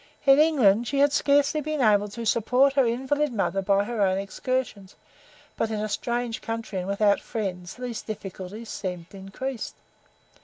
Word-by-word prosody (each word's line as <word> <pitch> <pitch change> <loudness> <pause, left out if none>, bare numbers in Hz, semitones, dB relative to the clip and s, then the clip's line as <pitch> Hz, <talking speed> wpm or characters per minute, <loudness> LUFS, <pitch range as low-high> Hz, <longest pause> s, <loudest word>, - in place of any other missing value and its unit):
In 275 0 +7
England 240 -8 +4
she 280 - -2
had 285 +1 +4
scarcely 285 +2 +3
been 310 0 -3
able 210 -4 +4
to 230 +3 -7
support 250 +5 +3
her 270 -3 +3
invalid 265 +5 0
mother 195 -3 0
by 200 +1 +2
her 225 0 -3
own 190 -1 +3
exertions, 200 0 -3 0.6
but 225 - -1
in 215 -1 -2
a 215 - -1
strange 235 +2 -2
country 225 -4 -4
and 180 - -5
without 200 +1 +2
friends 185 -6 -5
these 245 -3 -5
difficulties 205 +1 -7
seemed 180 -2 -5
increased. 200 +6 -6
225 Hz, 160 wpm, -25 LUFS, 200-260 Hz, 0.6 s, In